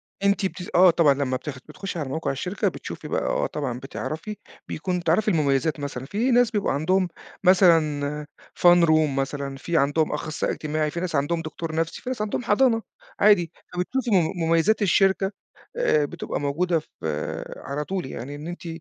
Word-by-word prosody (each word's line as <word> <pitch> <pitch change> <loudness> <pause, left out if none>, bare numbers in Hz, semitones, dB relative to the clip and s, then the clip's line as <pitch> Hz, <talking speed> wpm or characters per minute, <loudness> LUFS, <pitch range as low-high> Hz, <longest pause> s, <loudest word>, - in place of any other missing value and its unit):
آه. 200 - -9
أنتِ 200 0 +2
بتس 185 -1 -4
آه 180 +1 +8
طبعًا. 165 -4 +4
لمّا 135 -2 -1
بتاخ 140 -2 -7
بتخُشي 180 +3 -5
على 140 -4 -3
موقع 160 0 -2
الشركة، 180 +9 -2
بتشوفي - - -6
بقى - - -1
آه - - 0
طبعًا، 130 -5 -4
بتعرفي، 160 +9 -5 0.3
بيكون 180 +1 -3
تعرفي 170 +7 +2
المميزات 150 -4 +1
مثلًا. 135 -3 -5
في 225 - 0
ناس 245 -1 +4
بيبقوا 205 -2 0
عندهم 180 +6 +1 0.4
مثلًا 155 -5 +3 0.3
fun 175 -1 +7
room 155 -3 +3
مثلًا، 140 0 -3
في 170 +4 -1
عندهم 145 +2 +2
أخصائي 150 0 -2
اجتماعي، 155 0 -2
في 170 - -4
ناس 175 -3 -3
عندهم 155 +4 0
دكتور 160 0 -5
نفسي، 165 0 -2
في 255 - -5
ناس 250 -4 -3
عندهم 215 +3 -2
حضانة 225 +1 +3 0.4
عادي، 180 -5 +5 0.2
فبتشوفي 240 +7 -2
مم 175 -5 +3
مميزات 165 +7 +3
الشركة 195 0 +3 0.5
آآ 155 - +3
بتبقى - - -5
موجودة 165 +4 0
ف - - -18 0.7
على 140 +2 -4
طول، 190 -4 -2
يعني 130 +2 -6
إن 150 +2 -8
أنتِ 175 0 -7
165 Hz, 175 wpm, -24 LUFS, 145-190 Hz, 0.7 s, آه